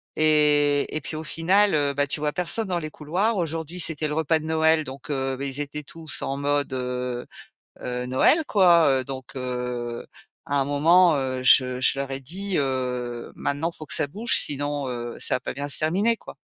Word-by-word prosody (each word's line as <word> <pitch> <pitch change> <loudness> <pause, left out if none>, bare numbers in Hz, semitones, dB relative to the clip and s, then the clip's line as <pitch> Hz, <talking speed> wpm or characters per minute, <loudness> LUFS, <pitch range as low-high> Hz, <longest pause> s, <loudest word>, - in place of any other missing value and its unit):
Et 150 -2 +3
et 155 - -2
puis, 155 - -7
au 155 - -5
final, 185 +5 +2
heu, 145 -2 +1
bah, 145 +1 0
tu 145 - -3
vois 150 0 -1
personne 185 +5 0
dans 180 -2 -1
les 155 -2 -6
couloirs. 185 +10 -1
Aujourd'hui, 165 0 -4
c'était 160 -2 +2
le 150 - -4
repas 160 0 +1
de 155 - -9
Noël, 160 0 +2
donc, 140 +2 -9
heu, 135 -1 -2
beh, 140 +1 -4
ils 135 +2 -3
étaient 145 +1 -5
tous 160 +1 0
en 135 - -2
mode, 145 -1 -1
heu 125 -1 -4 0.5
heu, 125 0 -4
Noël, 130 - +3
quoi, 175 -5 +5
heu, 135 -2 +2
donc, 135 0 -9
heu, 125 -2 -4 0.4
à 145 - -3
un 135 - 0
moment, 165 +4 +4
heu, 130 -2 -2
je 130 0 +4
je 135 +1 +2
leur 140 0 -4
ai 135 - -3
dit, 185 +8 -4
heu: 125 -3 -3
«Maintenant, 150 +4 -2
faut 155 - -10
que - - 0
ça - - +1
bouge, 215 +11 0
sinon, 145 -1 -1
heu, 120 -1 -5
ça - - +2
va - - -2
pas - - -6
bien 145 +2 -5
se - - +7
terminer, 195 +9 +1
quoi. - - -12
145 Hz, 210 wpm, -24 LUFS, 130-160 Hz, 0.5 s, se